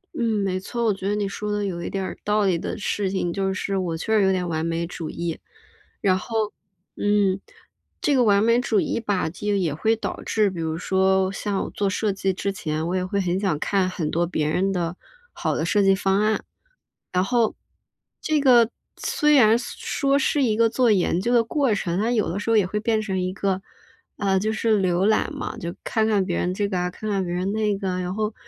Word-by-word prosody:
嗯， 220 -4 0
没 185 -1 -1
错， 235 +5 -3
我 215 - +3
觉 195 0 -5
得 205 - +1
你 205 -1 -1
说 210 +1 -4
的 205 0 -1
有 175 -3 -3
一 - - -4
点 195 -1 -3
儿 - - -5
道 210 0 +2
理 180 -4 +2
的 - - -4
事 205 -1 -1
情 180 -3 -1
就 195 0 0
是 195 +1 -2
我 175 -3 -2
确 220 +6 0
实 210 - +4
有 190 - +4
点 180 -1 -1
完 160 -2 -2
美 165 0 -1
主 165 -2 -6
义。 170 -1 -4 0.6
然 185 -2 +3
后， 220 +1 -2 0.4
嗯， 205 -2 +2 0.6
这 295 - +1
个 255 -2 +4
完 205 -2 +4
美 230 +1 +4
主 225 -4 +1
义 - - -1
吧， 205 -6 -1
就 205 +5 -2
也 175 -7 0
会 220 +9 +1
导 225 - -5
致 210 -3 +1
比 175 - -7
如 160 0 -2
说 190 +1 +2
像 200 0 -2
我 - - -5
做 200 -1 -1
设 205 +2 0
计 195 0 0
之 200 +2 -2
前， 160 -3 -3
我 180 - -1
也 185 - 0
会 190 +2 -1
很 180 -1 0
想 190 -7 0
看 190 +3 +1
很 165 -4 -3
多 170 +1 +1
别 155 -3 -1
人 185 +5 +1
的 175 -2 -2 0.4
好 - - -2
的 - - -1
设 205 - +2
计 195 0 +5
方 195 +1 +1
案。 215 0 +1 0.7
然 180 0 +2
后 235 +1 +1 0.7
这 310 -1 +1
个 245 -5 +5 0.3
虽 300 0 +2
然 225 -4 +6
说 275 +3 -1
是 285 0 +1
一 220 -4 +2
个 230 +1 +4
做 245 0 +3
研 180 -3 +2
究 240 +5 0
的 235 -1 +5
过 270 0 +1
程， 180 -3 -1
但 230 +4 +1
有 220 -3 +1
的 185 - -2
时 220 +2 -1
候 225 - +5
也 200 -4 +3
会 210 +3 -2
变 220 0 +1
成 195 -3 -2
一 185 0 -2
个 195 -1 -1 0.5
啊， 195 -2 +1
就 215 +3 0
是 220 -1 +2
浏 185 0 +1
览 220 - +1
嘛， - - -5
就 170 0 -5
看 220 -2 +1
看 210 -3 +2
别 180 -2 -2
人 180 - 0
这 205 +2 -1
个 195 -2 -2
啊， 180 0 -1
看 215 +4 -6
看 195 -2 0
别 175 - -3
人 180 +2 -1
那 210 -1 0
个 195 -1 -3
啊， 180 - -2
然 180 0 -3
后， 215 +1 -2
195 Hz, 255 characters per minute, -23 LUFS, 185-215 Hz, 0.7 s, 然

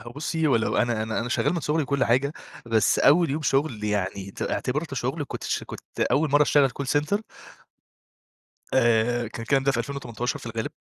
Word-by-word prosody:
هو 120 - -10
بُصي 155 +3 -1
ولو 115 -6 +1
أنا 120 -2 +1
أنا 110 +1 -2
أنا 120 - -3
شغال 125 - +1
من 170 - -1
صغري 155 +1 0
وكل 140 -1 0
حاجة، 130 +5 +2 0.3
بس 110 -3 +2
أول 165 +2 +5
يوم 155 +3 -2
شغل 135 -6 0
يعني 100 -2 -2
ت - - -7
اعتبرته 140 +2 -2
شغل، 135 +5 -2
كنت - - -6
ش - - -2
كنت - - -10
أول 150 +1 +2
مرّة 145 +1 +5
اشتغل 145 -2 +4
Call 140 +3 -5
center 150 +9 +1 1.6
آآ، 120 +1 +3
كان 115 - -7
الكلام 135 +4 +2
ده 140 0 +2
في 120 - -1
2018 125 -1 -3
في - - -11
الغالب. 115 -1 -3
130 Hz, 195 wpm, -25 LUFS, 115-145 Hz, 1.6 s, أول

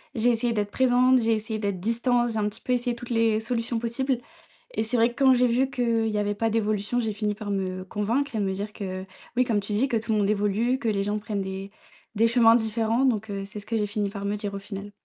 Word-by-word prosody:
j'ai 235 +2 +3
essayé 235 0 0
d'être 205 -1 -1
présente, 255 0 +4
j'ai 225 0 +2
essayé 220 0 -2
d'être 200 -4 -2
distante, 240 +2 +1
j'ai 220 - -3
un 210 -1 +1
petit 210 - -6
peu 250 - -4
essayé 245 -1 +1
toutes 245 +1 -9
les 225 -2 +2
solutions 230 0 -2
possibles 240 +2 -1 0.5
et - - 0
c'est 235 +3 -2
vrai 235 +1 +3
que 275 - -9
quand 265 -1 +7
j'ai 250 0 +4
vu 255 +3 +2
qu'il 235 -4 +1
y 215 -1 -1
avait 205 0 0
pas 225 +1 0
d'évolution, 215 +1 0
j'ai 220 - -1
fini 210 0 -1
par 210 -2 -5
me 185 -1 -2
convaincre 230 +9 -1
et - - 0
me 195 -2 0
dire 205 +2 -4
que, 190 -3 -5 0.3
oui, 250 - +4
comme 230 -4 +1
tu 205 +1 -4
dis, 250 +7 +1
que 235 - +1
tout 220 0 -2
le 210 - +2
monde 200 0 +2
évolue, 215 +5 +1
que 235 - -3
les 200 -2 +1
gens 210 +1 -1
prennent 205 -1 -3
des 190 +1 -5 0.4
des 225 +2 +4
chemins 230 -1 +6
différents, 225 +2 +1
donc 220 -4 0
heu, 195 -1 -3
c'est 210 +1 -8
ce 205 - -11
que 230 - -1
j'ai 210 - +1
fini 205 0 -2
par 200 0 -6
me 205 +1 0
dire, 205 -1 -4
au 200 - -4
final. 200 0 -8
220 Hz, 265 wpm, -26 LUFS, 205-240 Hz, 0.5 s, quand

